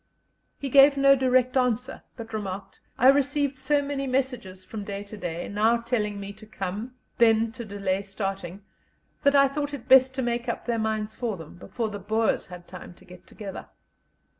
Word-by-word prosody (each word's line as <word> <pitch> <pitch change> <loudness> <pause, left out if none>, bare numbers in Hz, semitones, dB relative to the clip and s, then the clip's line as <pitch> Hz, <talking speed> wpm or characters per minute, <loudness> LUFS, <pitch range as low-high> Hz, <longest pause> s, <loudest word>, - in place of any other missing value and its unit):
He 280 - -4
gave 280 +2 +7
no 275 0 +6
direct 255 -1 +2
answer, 250 -2 0 0.2
but 225 -1 -9
remarked: 195 -2 -5 0.2
"I 255 - +6
received 285 0 +2
so 285 +2 +1
many 280 -1 -3
messages 250 -8 -2
from 210 0 -6
day 200 0 -5
to 205 +1 -10
day, 175 -4 -5
now 220 +3 +2
telling 225 -4 -2
me 200 0 -7
to 215 +1 -15
come, 210 +4 -5 0.2
then 225 -1 +4
to 235 - -7
delay 200 -2 -2
starting, 195 -1 -5 0.6
that 280 0 +3
I 275 0 +6
thought 290 +1 -3
it 260 - -11
best 260 0 +6
to 265 - -1
make 240 0 -2
up - - -4
their 235 -2 -1
minds 220 -1 -2
for 230 -5 -3
them, 160 -2 -11
before 225 +5 -4
the 205 -1 -6
Boers 220 +3 0
had 180 -1 -11
time 180 -1 -10
to 190 - -20
get 180 -1 -15
together." 200 -3 -8
225 Hz, 190 wpm, -26 LUFS, 200-260 Hz, 0.6 s, gave